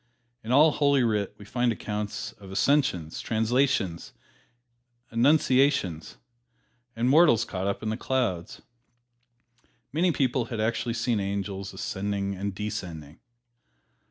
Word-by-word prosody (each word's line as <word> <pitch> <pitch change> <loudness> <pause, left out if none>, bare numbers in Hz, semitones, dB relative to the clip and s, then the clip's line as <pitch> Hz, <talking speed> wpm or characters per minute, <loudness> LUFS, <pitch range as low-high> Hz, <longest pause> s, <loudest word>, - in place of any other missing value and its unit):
In 110 - -4
all 150 +4 +6
"Holy 140 -3 +3
Writ" 105 -4 0
we 105 - -12
find 120 +3 0
accounts 105 -1 -4
of 100 -2 -12
"ascensions," 95 - +1
"translations," 110 -5 0 1.0
"annunciations," 130 - +2 0.8
and 115 +2 0
mortals 135 -6 +5
caught 95 -2 -4
up 100 +2 -2
into 110 0 -1
the - - -4
clouds. 120 -11 -2 1.3
Many 175 +4 +2
people 130 -5 0
had 115 -1 -5
actually 115 +1 -1
seen 115 -2 0
angels 100 0 -3
ascending 100 0 -3
and 100 +1 -4
descending. 85 -7 -6
110 Hz, 115 wpm, -27 LUFS, 100-130 Hz, 1.3 s, all